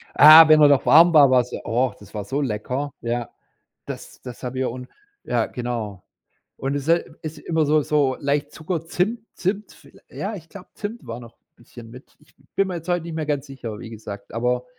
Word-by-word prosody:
Ah, 155 +2 +10
wenn 155 0 +7
er 145 - +8
noch 140 -2 +3
warm 165 +3 +7
war, 145 -3 +7
war's 125 -1 +2
ja - - -6
oh, 125 +3 0
das 105 - -16
war 105 -2 -5
so 140 +8 -2
lecker. 130 +4 -3
Ja. 120 0 -3 0.6
Das - - -9
das 125 -2 -10
haben 125 0 -5
wir 130 -2 -1
und 125 +1 -9 0.4
ja, 120 -2 0
genau. 115 -6 -5 0.5
Und 135 +2 -3
es 140 -1 -3
se 170 +1 +2 0.2
ist 155 -1 -7
immer 160 -2 0
so 150 +1 +3
so 145 -3 +1
leicht 145 0 -1
Zucker, 160 +1 -4
Zimt 190 +7 -1
Zimt, 195 +2 -3
viellei - - -19
ja, 210 +2 -5
ich 165 -3 -12
glaube, 190 -2 -12
Zimt 215 +3 -7
war 115 +1 -6
noch 120 -1 -14 0.2
bisschen 120 -1 -14
mit. 125 +3 -15
Ich 150 - -27 0.2
bin 195 -1 +2
mir 180 - -4
jetzt 165 +1 -8
heute 175 -1 +1
nicht 165 -1 -7
mehr 155 -2 -3
ganz 145 -1 -2
sicher, 120 -5 -8
wie 115 - -9
gesagt. 105 -2 -9
Aber 125 +1 -1
140 Hz, 215 wpm, -22 LUFS, 120-160 Hz, 0.6 s, Ah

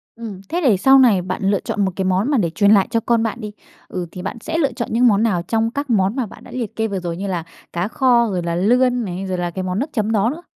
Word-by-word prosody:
Ừm. 220 -5 -8
Thế 350 +1 -1
để 240 - +4
sau 270 +7 +6
này 225 -8 +5
bạn 180 - -4
lựa 195 0 +2
chọn 205 - -1
một 190 - -1
cái 190 - -2
món 190 +8 +1
mà 280 - +3
để 175 -6 +1
truyền 200 +4 +3
lại 200 -3 +5
cho 230 - +1
con 230 0 +1
bạn 230 +2 -3
đi, 210 -1 -6 0.4
ừ, 180 -1 -4
thì 180 - -8
bạn 195 +6 -5
sẽ 320 +5 -3
lựa 285 -5 +1
chọn 235 0 -4
những 240 +3 +4
món 210 -1 +3
nào 195 -7 +1
trong 225 +4 0
các 285 +2 -4
món 200 -2 +2
mà 260 -3 -1
bạn 205 - -13
đã - - -13
liệt 235 -5 -5
kê 225 0 0
vừa 195 -2 -3
rồi? 170 -1 -4
Như 200 +2 -4
là 180 -4 -2 0.3
cá 175 +3 -1
kho, 240 -1 +3
rồi 180 -3 -2
là 170 0 -2
lươn 245 +5 +2
này, 185 0 -5
rồi 185 -1 -3
là 175 -1 -2
cái 185 +2 -4
món 185 +1 -2
nước 285 +5 -2
chấm 215 -2 0
đó 215 +1 +2
nữa? 320 +6 -7
215 Hz, 305 wpm, -20 LUFS, 185-240 Hz, 0.4 s, sau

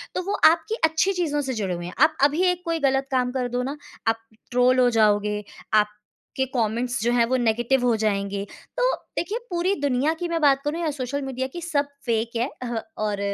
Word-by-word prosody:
तो 365 - -1
वो 410 - -1
आपकी 335 +6 -2
अच्छी 320 +5 +2
चीज़ों 315 -5 0
से - - 0
जुड़े 200 -6 -2
हुए 175 0 -6
हैं। 180 - -7
आप 310 +2 +4
अभी 295 +5 +4
एक 360 0 -4
कोई 330 -1 0
गलत 270 0 0
काम 250 -1 +1
कर 250 -1 -2
दो 250 - 0
ना, 275 +3 -4 0.3
आप 225 0 +2 0.3
ट्रोल 250 +1 +4
हो 250 -1 +5
जाओगे, 210 -1 +2 0.3
आपके 210 +5 -1
कमेंट्स 240 0 0
जो 240 - +2
हैं 235 -1 +4
वो 255 +3 0
नेगेटिव 240 +2 +1
हो 240 -2 +3
जाएँगे। 200 -2 -1 0.3
तो - - +3 0.2
देखिए 400 +6 -1
पूरी 355 +2 +1
दुनिया 285 +2 +2
की 350 - -2
मैं 335 -1 0
बात 275 -2 +4
करूँ 310 +3 -2
या 325 - 0
सोशल 280 0 -3
मीडिया 260 -1 -3
की 345 - -6
सब 295 -4 0 0.2
फ़ेक 230 -1 0
है 240 +4 0
अह 240 -1 -3 0.3
और 210 -1 -1
255 Hz, 210 wpm, -24 LUFS, 225-310 Hz, 0.3 s, हो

